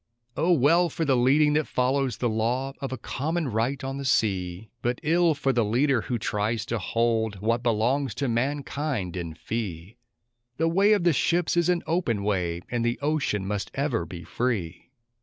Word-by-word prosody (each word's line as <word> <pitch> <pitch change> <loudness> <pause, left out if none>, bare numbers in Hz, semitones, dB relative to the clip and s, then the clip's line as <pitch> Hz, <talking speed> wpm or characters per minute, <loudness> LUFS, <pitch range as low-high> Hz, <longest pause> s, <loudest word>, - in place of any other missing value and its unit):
O 175 - +2
well 170 +3 +4
for 165 - -2
the 135 -3 +3
leading 145 +5 +4
that 155 0 +1
follows 130 -1 0
the 120 - 0
law 120 +5 -1
of 135 - -4
a 130 - -3
common 155 +6 -2
right 120 +5 -1
on 135 +1 -3
the 140 - -4
sea! 95 -5 0
But 120 +2 -1
ill 165 +1 +3
for 135 -1 0
the 120 -1 +2
leader 125 +4 +2
who 120 - -2
tries 110 +1 -1
to 115 - -1
hold 110 +1 0
what 115 +4 0
belongs 120 +2 +1
to 140 - -1
mankind 135 - -2
in 85 -3 -5
fee! 100 +1 -5 0.6
The 165 - +2
way 195 +5 +4
of 205 - +2
the 170 -2 +4
ships 170 +6 +1
is 170 0 +2
an 175 -1 +1
open 155 - 0
way, 90 -4 -1
and 120 -1 0
the 120 0 0
ocean 140 -9 0
must 100 0 -3
ever 140 - 0
be 85 0 -8
free! 100 -9 -3
125 Hz, 185 wpm, -26 LUFS, 110-145 Hz, 0.6 s, well